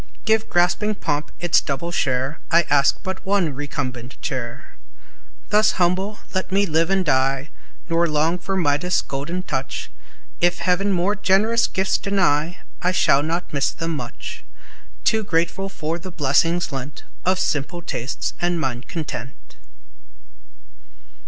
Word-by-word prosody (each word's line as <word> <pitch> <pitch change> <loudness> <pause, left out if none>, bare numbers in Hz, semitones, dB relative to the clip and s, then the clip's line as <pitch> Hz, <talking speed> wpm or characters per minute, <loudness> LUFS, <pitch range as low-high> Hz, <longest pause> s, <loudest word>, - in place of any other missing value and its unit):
Give 220 0 +2
grasping 180 +5 +2
pomp 150 -5 -2
its 175 -1 +3
double 150 +5 -3
share, 135 -1 0
I 170 +1 +5
ask 140 -1 +4
but 190 0 -4
one 190 -6 +1
recumbent 130 -3 -5
chair. 125 +3 -5 0.8
Thus 215 +1 +4
humble 190 +4 0
let 185 0 -1
me 200 +1 +3
live 165 -1 +2
and 190 -1 +2
die, 135 0 +1 0.4
Nor 170 0 +2
long 155 +4 +1
for 195 +1 -2
Midas' 170 +2 +2
golden 160 +7 -4
touch; 135 -6 -4 0.5
If 175 0 +3
Heaven 190 +3 +1
more 190 +3 +2
generous 210 +4 +3
gifts 190 0 +1
deny, 175 -4 +1 0.2
I 180 - +2
shall 140 -6 +4
not 165 +3 -2
miss 140 -2 +2
them 165 0 -3
much, 155 - -6 0.6
Too 220 -1 +3
grateful 185 +1 0
for 165 -2 -3
the 185 - -7
blessing 165 +2 +2
lent 135 +1 -6 0.2
Of 185 +1 +2
simple 170 +2 -1
tastes 125 -2 -3
and 175 -1 +1
mind 125 -4 -3
content! 140 -6 -6
170 Hz, 140 wpm, -22 LUFS, 145-190 Hz, 0.8 s, I